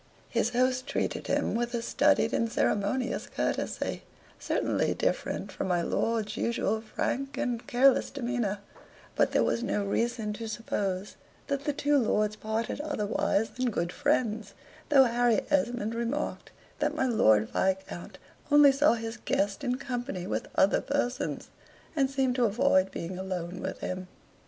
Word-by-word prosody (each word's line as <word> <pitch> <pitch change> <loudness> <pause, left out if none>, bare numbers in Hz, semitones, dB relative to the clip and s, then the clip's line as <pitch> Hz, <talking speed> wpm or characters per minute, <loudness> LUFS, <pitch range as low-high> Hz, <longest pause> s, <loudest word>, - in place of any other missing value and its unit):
His 230 -1 +1
host 255 +2 +1
treated - - -2
him - - +1
with 240 +1 -1
a 230 - -2
studied 285 -2 +3
and 230 -1 +1
ceremonious 235 +5 0
courtesy, - - -2 0.4
certainly - - 0
different - - -1
from - - -3
my 175 -2 +1
lord's 220 +1 -1
usual 220 -2 0
frank 270 +4 -3
and 245 -5 -2
careless 260 +2 +4
demeanor; 240 -6 -2 0.6
but - - +3
there - - +3
was 235 - 0
no 210 -4 -1
reason 225 +1 -1
to 225 +1 -6
suppose 200 -3 -3 0.3
that 280 0 -2
the 295 - +2
two 290 0 +2
lords 215 -3 +1
parted 220 +6 -3
otherwise 220 -6 0
than 255 0 -1
good 170 -5 -2
friends, 215 -3 0 0.3
though 280 -3 +7
Harry 240 -2 +2
Esmond 240 -6 +1
remarked 235 +6 -3 0.3
that - - 0
my 265 - +1
Lord 110 - +4
Viscount 190 -2 -2 0.3
only 290 -1 +8
saw 275 +1 +4
his 225 0 -4
guest 200 -1 -1
in 250 -1 0
company 245 -8 -4
with - - -2
other 195 - +4
persons, 260 -3 -2 0.5
and 270 -3 +2
seemed 265 -2 +1
to 245 - +4
avoid 215 -3 +3
being 180 +2 -5
alone 185 -2 -4
with - - -5
him. 185 0 -4
235 Hz, 150 wpm, -29 LUFS, 205-260 Hz, 0.6 s, only